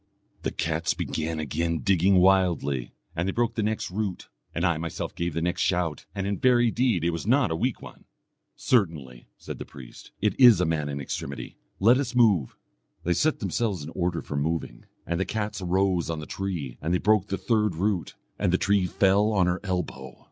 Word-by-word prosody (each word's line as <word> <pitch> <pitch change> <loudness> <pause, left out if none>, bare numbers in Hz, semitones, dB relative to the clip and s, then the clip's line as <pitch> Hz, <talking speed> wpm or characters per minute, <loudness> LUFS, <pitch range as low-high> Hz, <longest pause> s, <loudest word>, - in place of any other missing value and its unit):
The - - -1
cats - - -1
began 80 0 -3
again 80 +2 -1
digging 95 0 +3
wildly, 90 -9 +2 0.2
and 85 +2 -1
they - - +1
broke 120 +3 0
the 110 - -1
next 110 -3 -2
root; 100 -1 -3 0.3
and 85 +2 0
I 85 -2 +2
myself 85 -1 -4
gave 85 -2 -3
the 85 - -1
next 90 +1 -1
shout, 85 -5 0
and 95 -1 -2
in 100 0 -2
very 120 -2 +4
deed 115 -9 +1
it 85 - +2
was 85 +4 -5
not 130 - +3
a - - 0
weak 125 +8 -2
one. - - -12 0.5
'Certainly,' 80 - 0
said - - -8
the - - -4
priest, 65 -3 -13
'it 105 -1 +1
is 120 -7 +8
a 90 - +2
man 75 -2 -1
in 70 0 -4
extremity 70 0 -5 0.2
let 120 +6 +5
us 130 -3 -3
move.' 105 - +3 0.5
They 90 - +1
set 155 - +1
themselves 100 -2 -1
in 75 - -7
order 90 -2 -2
for 75 - -6
moving. 75 -4 -2 0.2
And 85 +1 -2
the - - +2
cats 105 +1 -3
arose 90 -1 +1
on 80 - -2
the 75 - -6
tree, 85 -11 -4
and 85 +3 0
they - - +4
broke 105 0 +2
the 95 - -2
third 105 -1 +1
root, 95 +1 -1 0.2
and - - +1
the 90 - +3
tree 100 -2 +2
fell 100 +3 +3
on 95 -4 +3
her 90 +1 0
elbow. 85 -9 -4
90 Hz, 205 wpm, -26 LUFS, 80-105 Hz, 0.5 s, is